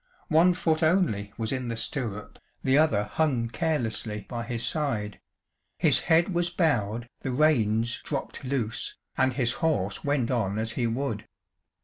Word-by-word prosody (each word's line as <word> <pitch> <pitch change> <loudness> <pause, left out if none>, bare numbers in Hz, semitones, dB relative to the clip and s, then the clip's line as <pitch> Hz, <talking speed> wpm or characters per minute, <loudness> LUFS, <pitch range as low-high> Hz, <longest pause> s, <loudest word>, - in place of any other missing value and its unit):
One 170 +3 +5
foot 160 -2 +1
only 155 - +2
was 110 0 -2
in 130 -2 -2
the 115 - -2
stirrup, 115 -5 -4 0.2
the 130 - +3
other 140 -9 +4
hung 120 +1 0
carelessly 115 - -2
by 120 -1 -4
his 120 0 -1
side; 120 - -1 0.6
his - - +5
head 170 +4 +4
was 175 0 +1
bowed, 120 - 0
the - - -4
reins 120 -5 +2
dropped 140 -1 -5
loose, 125 -4 -2 0.2
and 130 0 +2
his 120 -1 +1
horse 105 - 0
went 140 -4 0
on 105 -5 0
as 110 +1 -1
he 120 0 -1
would. 115 -3 -3
125 Hz, 150 wpm, -27 LUFS, 110-155 Hz, 0.6 s, One